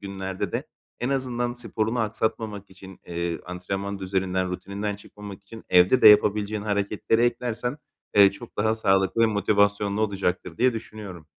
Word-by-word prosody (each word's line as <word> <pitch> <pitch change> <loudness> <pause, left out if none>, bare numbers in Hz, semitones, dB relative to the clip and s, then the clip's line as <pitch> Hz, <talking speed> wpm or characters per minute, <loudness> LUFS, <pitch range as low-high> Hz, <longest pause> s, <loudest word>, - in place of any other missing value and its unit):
günlerde 95 -1 -5
de - - -3 0.3
en 120 - -1
azından 125 -3 -1
sporunu 115 -1 -2
aksatmamak 110 -2 -2
için, 95 0 -13
eee, 85 -1 -3
antrenman 95 +2 -4
düzeninden, 95 -1 -1
rutininden 100 +3 -4
çıkmamak 100 -1 -11
için 110 +3 -12
evde 90 +8 +5
de - - +11
yapabileceğin 105 0 +4
hareketleri 105 +2 0
eklersen, 120 +2 -1 0.4
eee, 100 -1 +7
çok 115 +4 -12
daha 110 +2 +2
sağlıklı 95 +1 +2
ve - - +6
motivasyonlu 100 -1 +1
olacaktır 95 -4 -2
diye 125 0 +4
düşünüyorum. 105 -7 -8
100 Hz, 140 wpm, -25 LUFS, 95-110 Hz, 0.4 s, de